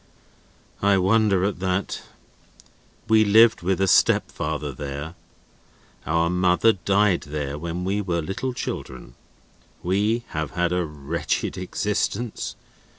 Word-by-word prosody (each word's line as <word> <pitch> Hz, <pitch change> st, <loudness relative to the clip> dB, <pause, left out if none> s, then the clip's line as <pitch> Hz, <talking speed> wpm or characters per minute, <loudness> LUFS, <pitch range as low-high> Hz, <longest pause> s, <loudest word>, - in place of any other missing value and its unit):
"I 100 Hz, 0 st, +4 dB
wonder 100 Hz, 0 st, +3 dB
at 100 Hz, -2 st, -1 dB
that. 95 Hz, +1 st, -2 dB, 1.1 s
We 110 Hz, 0 st, +5 dB
lived 110 Hz, -1 st, +5 dB
with 95 Hz, +2 st, 0 dB
a 95 Hz, -, +2 dB
stepfather -, -, +2 dB
there. 70 Hz, +3 st, -6 dB, 0.9 s
Our 85 Hz, +1 st, +2 dB
mother 90 Hz, +5 st, +3 dB
died 100 Hz, 0 st, +2 dB
there, 70 Hz, -1 st, -4 dB
when 85 Hz, +3 st, -4 dB
we 100 Hz, +3 st, 0 dB
were 90 Hz, -4 st, -1 dB
little 120 Hz, +9 st, -3 dB
children. 65 Hz, -, -6 dB, 0.7 s
We 105 Hz, +6 st, +1 dB
have 80 Hz, -2 st, -4 dB
had 90 Hz, 0 st, +1 dB
a 90 Hz, -1 st, 0 dB
wretched 75 Hz, +2 st, -3 dB
existence. 105 Hz, +4 st, -2 dB
90 Hz, 115 wpm, -24 LUFS, 85-105 Hz, 1.1 s, We